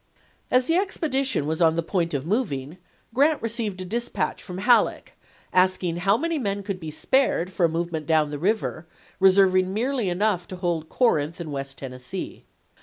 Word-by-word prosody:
As 255 0 +3
the 330 +4 +2
expedition 275 - 0
was 160 +3 -2
on 160 -1 +4
the 170 - 0
point 170 -3 -1
of 140 0 -3
moving 170 - -2 0.3
Grant 290 +5 +3
received 220 -4 -3
a - - -5
dispatch 235 +6 -2
from 180 -1 -8
Halleck, 240 +5 +2 0.4
asking 185 -2 +2
how 195 +4 +3
many 330 +2 -1
men 200 -4 -2
could 195 -2 -4
be 160 -3 -6
spared 185 - +1
for 180 -2 +2
a - - -5
move 170 +1 -2
ment 155 -2 -4
down 155 -2 +2
the 145 - -4
river, 180 -3 -1 0.3
reserving 185 -1 +4
merely 235 0 -1
enough 180 0 0
to 185 - -7
hold 170 -3 -2
Corinth 165 - +1
and 165 -3 -6
West 135 -1 -5
Tennessee. 125 -2 -7
185 Hz, 180 wpm, -24 LUFS, 160-230 Hz, 0.4 s, on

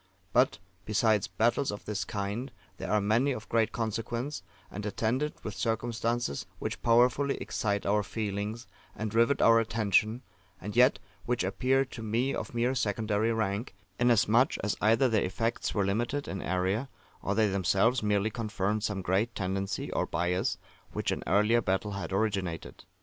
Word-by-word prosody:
But, 125 +2 +4 0.3
besides 110 -1 +2
battles 120 +5 +1
of 105 - -8
this 105 -2 -2
kind, 105 +6 -3 0.3
there - - -5
are 105 - +3
many 115 +7 +2
of 110 -3 -7
great 115 -1 +2
consequence, 115 +5 -3 0.3
and 105 - -6
attended 115 +8 -1
with 105 - -4
circumstances 115 -6 -1
which - - -4
powerfully 125 +4 +3
excite 100 -1 -2
our 105 +1 +3
feelings, 105 +2 -4 0.3
and 110 -1 -4
rivet 115 +5 +3
our 115 0 +7
attention, 110 +1 +1 0.4
and 105 +3 -6
yet 125 +3 +6 0.3
which 125 0 +1
appear 135 +1 +1
to 125 -3 -9
me 115 +5 0
of - - -5
mere 120 +2 +2
secondary 110 -1 0
rank, 110 0 -2 0.2
inasmuch 120 +1 +4
as 105 - 0
either 115 +5 +4
their 110 -3 +2
effects 115 +6 -2
were 100 -2 +2
limited 120 +8 -1
in 95 - -4
area, 95 +8 -1 0.3
or - - -1
they 110 -1 +4
themselves 100 +6 +2
merely 105 0 +1
confirmed 105 -2 -1
some 100 -3 -2
great 100 +6 0
tendency 95 0 -2
or - - 0
bias 90 +2 0 0.4
which - - -1
an - - -3
earlier 105 +5 +4
battle 95 +1 -1
had 100 -4 -5
originated. 95 -5 -2
110 Hz, 155 wpm, -29 LUFS, 100-120 Hz, 0.4 s, our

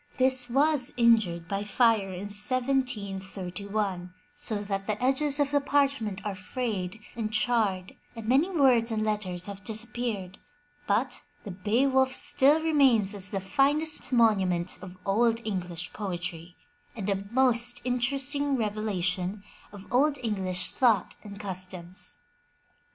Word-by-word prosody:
This 255 -1 +2
was 275 0 +2
injured 220 -9 +3
by 200 +2 -2
fire 210 -2 +2
in 185 +1 -6
1731, 200 -6 -2 0.2
so 210 -2 -4
that 195 -1 -3
the 215 -1 -1
edges 275 +3 +1
of 285 -1 +1
the 285 0 +2
parchment 270 -8 0
are 205 - -2
frayed 195 -1 -4 0.2
and 220 -2 -3
charred 215 -5 0 0.2
and 225 -1 -7
many 275 +9 +3
words 260 -9 +3
and 215 -1 -1
letters 195 -5 -2
have 200 0 -7
disappeared, 220 -4 -4 0.5
but 220 +6 0 0.2
the 200 - -7
Beowulf 260 +8 +1
still 295 +4 +6
remains 265 -10 +3
as 200 -1 0
the 195 - -2
finest 285 +11 0
monument 190 -7 +2
of 185 0 -10
Old 225 +3 +2
English 180 -4 -4
poetry, 180 -3 -5 0.4
and 210 -4 -5
a 195 -1 -1
most 245 0 +3
inter 250 +2 0
esting 280 0 0
revelation 200 -3 -2 0.3
of 200 -1 -11
Old 285 +3 +3
English 190 -5 -2
thought 225 -7 +2
and 200 -1 -10
customs. 185 +6 -5
215 Hz, 130 wpm, -27 LUFS, 190-255 Hz, 0.5 s, still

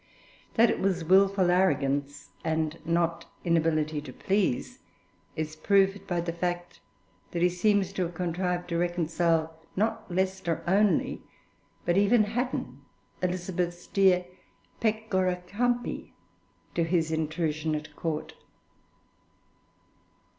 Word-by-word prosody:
That 230 0 +5
it - - -2
was 185 -3 0
wilful 190 +1 +4
arrogance, 145 -6 +1
and 160 0 -1
not 170 0 0 0.2
inability 155 -3 +1
to 150 - -9
please, 195 -9 -1 0.6
is 155 0 -3
proved 195 +3 +2
by 175 -1 0
the 170 0 -3
fact 175 0 -3 0.5
that 170 0 -1
he 180 - +5
seems 195 +1 +1
to 195 - -2
have 175 -1 -2
contrived 180 +1 -1
to 170 -1 0
reconcile 165 -2 0 0.2
not 220 +1 -1
Leicester 185 -2 -1
only 195 0 +2 0.6
but 175 +1 +2
even 215 +3 +5
Hatton, 220 - -3 0.4
Elizabeth's 180 -1 -2
dear 185 -2 +3 0.5
'Pecora 190 -5 0
Campi,' 240 +5 -1 0.6
to 170 - +1
his 165 -1 +1
intrusion 160 -1 -1
at 150 0 -6
Court. 160 -2 -3
175 Hz, 110 wpm, -28 LUFS, 160-195 Hz, 0.6 s, That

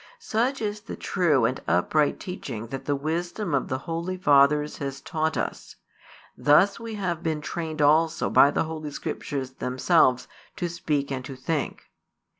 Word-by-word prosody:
Such 260 - -1
is 210 0 -3
the 225 - -7
true 155 - +2
and 130 +3 -1
upright 140 - +2
teaching 125 - -6
that 135 +1 -6
the 145 - +1
wisdom 170 +5 -3
of 135 - +1
the 130 - -1
holy 170 +6 -4
fathers 150 -2 +4
has 135 -1 -4
taught 160 +2 -2
us: - - -4 0.6
thus 175 +9 +4
we 230 -1 -6
have 180 -5 -2
been 160 -2 -1
trained 155 -1 -3
also 160 +3 +3
by 140 - +7
the - - 0
Holy 155 -1 -5
Scriptures 135 -2 -4
themselves 130 0 +2 0.3
to 175 - -2
speak 150 -4 -2
and 130 -1 -3
to 135 - -7
think. 145 +3 -3
155 Hz, 160 wpm, -26 LUFS, 140-175 Hz, 0.6 s, by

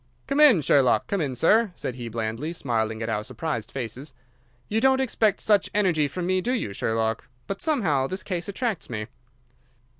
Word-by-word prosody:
"Come 275 +1 -1
in, 275 - +7
Sherlock! 130 -5 +3
Come 200 -3 -1
in, 135 -4 -2
sir," 210 - +3
said 125 - -4
he 120 -2 -6
blandly, 115 +8 -3
smiling 115 -7 -2
at 110 - -3
our 105 -1 -1
surprised 130 0 -4
faces. 130 +2 -6 0.5
"You 220 +1 0
don't 265 +1 +4
expect 225 -5 +1
such 205 -3 +2
energy 175 -8 +2
from 175 +5 -4
me, 185 +1 +1
do 245 +6 -1
you, 110 - -2
Sherlock? 110 +1 -1 0.2
But 195 - -5
somehow 170 - +1
this 185 +5 -5
case 180 0 -3
attracts 220 -2 -3
me." 110 -3 -4
155 Hz, 180 wpm, -25 LUFS, -, 0.5 s, in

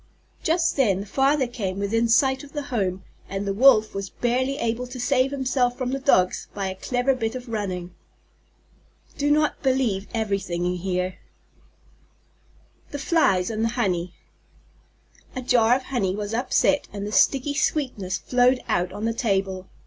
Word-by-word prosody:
Just 330 0 +1
then 200 -8 +2
the - - -7
Father 270 +5 +2
came 205 -6 -4
within 225 +4 +1
sight 265 +3 +3
of 285 - -13
the 295 -1 -3
home, 190 -4 -1 0.3
and 195 +1 -3
the 200 - -1
Wolf 220 -1 +5
was 195 -1 -4
barely 255 +3 -1
able 235 0 -2
to 250 0 -8
save 255 +1 +2
himself 255 -2 0
from 255 -1 -2
the 270 - -2
Dogs 185 -9 +2
by 200 -1 -2
a - - -4
clever 245 +6 0
bit 225 -2 -3
of 250 0 -7
running. 185 -6 -4 1.3
Do 290 +1 +1
not 300 +1 +2
believe 255 -8 0
everything 200 -6 -2
you 180 0 0
hear. 180 0 -2 1.7
THE 285 - -5
FLIES 230 - +2
AND 220 0 -2
THE 230 - +2
HONEY 180 -6 -1 1.2
A 255 - -4
jar 240 -1 +4
of 260 - -3
honey 210 -9 -1
was 210 +1 -4
upset 260 +4 +1
and 200 -1 -5
the 210 - -5
sticky 270 +7 +3
sweetness 260 -10 -1
flowed 250 +1 +2
out 180 +1 0
on 205 +3 -5
the 230 - 0
table. 195 -4 -1
230 Hz, 165 wpm, -24 LUFS, 195-265 Hz, 1.7 s, Wolf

